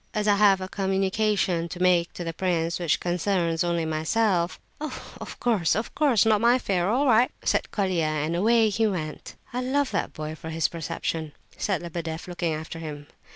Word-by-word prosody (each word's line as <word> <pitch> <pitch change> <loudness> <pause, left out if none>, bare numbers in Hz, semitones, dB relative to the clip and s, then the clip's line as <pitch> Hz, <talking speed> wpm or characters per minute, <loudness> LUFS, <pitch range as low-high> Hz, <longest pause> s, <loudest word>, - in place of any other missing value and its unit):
"As 210 0 0
I 205 -1 +4
have 195 -2 +5
a 185 - -3
communication 195 -2 0
to 175 - -7
make 180 -2 +3
to 175 - -5
the 165 -1 -4
prince 170 -1 -1
which 170 -3 +1
concerns 175 -2 0
only 170 -1 0
myself—" 170 +3 0 0.2
"Of 305 +1 -7
course, 210 -10 +2
of 220 +3 -3
course, 260 -9 +3
not 215 -2 +3
my 235 +1 +5
affair. 190 -7 0
All 260 +6 +2
right," 245 -1 +5
said - - +1
Colia, 185 -5 0
and 155 +1 -1
away 220 +4 +4
he 220 +2 +1
went. 160 -7 -5 0.2
"I 250 - -1
love 270 +2 0
that - - -1
boy 155 0 -5
for 160 +1 -8
his 160 0 +1
perception," 165 -1 -4 0.2
said 190 -4 -1
Lebedeff, 165 -1 -5
looking 175 -2 -2
after 160 +1 -5
him. 150 -2 -7
180 Hz, 185 wpm, -26 LUFS, 165-210 Hz, 0.2 s, have